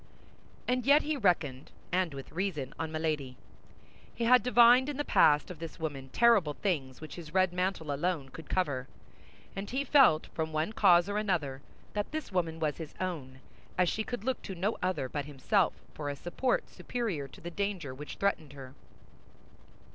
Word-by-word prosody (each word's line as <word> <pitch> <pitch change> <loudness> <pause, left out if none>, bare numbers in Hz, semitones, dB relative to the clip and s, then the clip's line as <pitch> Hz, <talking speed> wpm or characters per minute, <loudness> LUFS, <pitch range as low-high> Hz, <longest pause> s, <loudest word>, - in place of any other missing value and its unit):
And 250 0 +1
yet 285 +4 +5
he 305 +1 -1
reckoned, 170 - 0 0.2
and 180 -4 0
with 135 - -8
reason, 165 -7 -3
on 160 -1 -3
Milady. 155 -5 -2 0.8
He 235 - -2
had 250 +1 +6
divined 245 +3 +6
in 290 - -4
the 290 - -1
past 150 +3 +4
of 170 - -9
this 165 -1 -7
woman 140 -4 -4
terrible 205 - +4
things 140 -10 -2
which 155 - -8
his 165 -1 -9
red 185 -2 +3
mantle 180 -4 -1
alone 150 -2 -1
could 160 +3 -11
cover; 140 -8 0 0.7
and 195 +1 -5
he 265 +3 -1
felt, 255 - +5
from 160 -1 -2
one 155 +7 -1
cause 175 -4 +5
or 205 +1 -1
another, 160 -10 -1 0.3
that 205 -1 -2
this 310 -5 -4
woman 165 -3 -1
was 155 -2 -1
his 160 -3 -8
own, 140 -8 -4 0.4
as 180 -1 +3
she 220 - -1
could 245 -2 -5
look 260 +2 -1
to 190 - -6
no 195 +6 0
other 185 -8 -1
but 145 +2 -4
himself 150 +7 +1 0.2
for 145 -2 -4
a 140 - -3
support 175 - -1
superior 205 - -3
to - - -15
the 175 - -7
danger 190 -7 -3
which 145 +3 -8
threatened 160 -8 -1
her. 135 -2 -10
175 Hz, 180 wpm, -31 LUFS, 150-205 Hz, 0.8 s, had